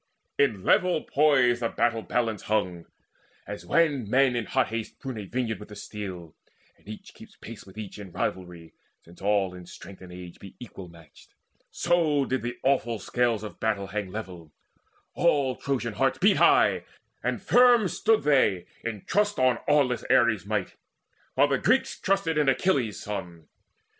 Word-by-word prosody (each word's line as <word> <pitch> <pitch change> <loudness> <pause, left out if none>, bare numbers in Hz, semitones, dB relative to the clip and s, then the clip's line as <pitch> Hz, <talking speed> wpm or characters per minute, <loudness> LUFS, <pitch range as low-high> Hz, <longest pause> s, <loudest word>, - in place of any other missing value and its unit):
In 110 -9 +2
level 180 -4 +2
poise 135 -5 +3
The 115 -1 -1
battle 115 -1 0
balance 115 -2 -1
hung. 90 -6 -1 0.6
As 85 - -8
when 165 - +4
young 125 -8 -5
men 130 +1 +3
In 120 -2 -2
hot 130 -1 +1
haste 115 -1 -5
prune 130 -5 -6
a 105 - -6
vineyard 110 -1 -3
with 105 - -11
the 105 - -10
steel, 95 -6 -8 0.4
And - - -19
each 110 - -10
keeps - - -15
pace 110 -3 -11
with 95 - -15
each 105 -1 -7
in 100 -3 -9
rivalry, 90 -2 -5 0.3
Since 85 +1 -18
all 100 -2 +1
in 90 -1 -11
strength 95 +1 -12
and 90 -1 -11
age 90 -1 -10
be 95 - -12
equal 100 -6 -10
matched; 80 -3 -18 0.3
So 160 -5 +1
did 130 -1 -2
the 120 +1 -5
awful 125 -4 +1
scales 120 -1 0
of 105 - -9
battle 105 -3 -1
hang 105 -3 -3
Level: 90 -6 -8 0.6
all 140 -6 +2
Trojan 120 -5 -3
hearts 135 +3 +1
beat 200 +2 +4
high, - - +4 0.4
and - - -1
firm 245 -4 +5
Stood 220 +4 +1
they 105 -11 +2 0.2
in 110 -4 -5
trust 205 0 +1
on 130 -2 +2
aweless 140 -4 +2
Ares' 110 -5 +3
might, 105 -3 -2 0.6
While 145 +2 +4
the 135 - +1
Greeks 260 +5 +1
trusted 185 -5 0
in 145 -2 +3
Achilles' 135 - +1
son. 90 -6 -7
115 Hz, 170 wpm, -26 LUFS, 95-140 Hz, 0.6 s, firm